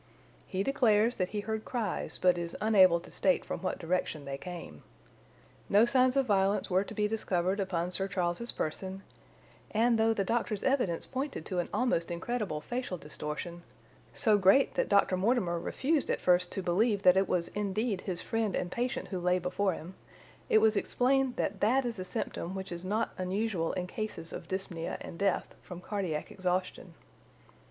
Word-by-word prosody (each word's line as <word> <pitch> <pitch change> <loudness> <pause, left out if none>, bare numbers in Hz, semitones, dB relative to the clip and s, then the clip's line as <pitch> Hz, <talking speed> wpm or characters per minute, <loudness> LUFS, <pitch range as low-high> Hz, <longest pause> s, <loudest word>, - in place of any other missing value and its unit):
He 190 +1 -1
declares 230 -2 +3
that 185 0 0
he 210 - -3
heard 220 +1 -3
cries 230 -6 -2
but 180 -1 +4
is 170 -1 -4
unable 190 -5 +5
to - - -14
state 185 -2 +1
from - - -4
what 185 - -2
direction 165 -4 -2
they 135 0 -4
came. 175 +4 -8 0.9
No 210 +3 +6
signs 255 +1 +3
of 275 -1 +3
violence 200 -2 +1
were 185 +2 +3
to 215 - -9
be 210 0 +1
discovered 190 -3 0
upon 180 -2 -1
Sir 190 +2 -1
Charles's 180 +4 -2
person, 190 +5 -4 0.7
and 230 +1 +2
though 225 0 +4
the 210 -3 0
doctor's 220 -1 -1
evidence 245 -11 +1
pointed 270 - -4
to 185 - -2
an 175 - -2
almost 215 -10 +1
incredible 175 -2 -3
facial 245 -4 -4
distortion—so 170 - -3
great 195 +8 +5
that - - 0
Dr. 200 -2 +4
Mortimer 185 -4 +1
refused 290 - 0
at - - +1
first 180 0 +3
to 195 - -3
believe 200 +3 +2
that 180 - +7
it 190 0 +2
was 170 -2 0
indeed 205 0 -1
his 180 -3 -4
friend 225 -4 -1
and 175 - -2
patient 245 +4 -2
who 185 - -3
lay 180 +1 +2
before 185 +2 0
him—it 180 +5 -4
was 220 0 +4
explained 260 +4 +1
that 195 0 -2
that 250 +6 +3
is 230 -4 -3
a - - -2
symptom 185 0 -4
which 190 -1 -6
is 175 0 -5
not 210 +4 -1
unusual 185 -2 -1
in 180 - -2
cases 200 -4 -5
of 165 - -7
dyspnœa 185 -3 -4
and 165 - -8
death 195 -2 0
from 180 -1 -9
cardiac 180 -6 -3
exhaustion. 185 -1 -2
195 Hz, 175 wpm, -31 LUFS, 180-220 Hz, 0.9 s, that